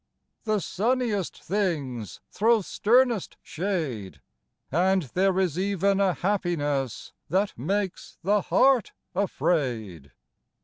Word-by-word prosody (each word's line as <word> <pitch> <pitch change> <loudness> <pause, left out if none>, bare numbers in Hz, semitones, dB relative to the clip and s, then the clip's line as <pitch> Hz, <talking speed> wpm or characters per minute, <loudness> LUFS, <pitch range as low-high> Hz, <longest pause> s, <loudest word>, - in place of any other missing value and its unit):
The 215 -1 +1
sunniest 220 -1 -1
things 150 - -2
throw 225 +1 +3
sternest 235 +1 +2
shade, 155 - -3 0.5
And 185 +4 +2
there 185 +7 +1
is 180 -3 0
ev'n 195 0 +1
a 195 -2 +3
happiness 145 - -1 0.2
That 195 +3 +1
makes 190 - -3
the 205 +3 +3
heart 260 +4 +3 0.2
afraid! 120 - -1
190 Hz, 95 wpm, -26 LUFS, 145-205 Hz, 0.5 s, throw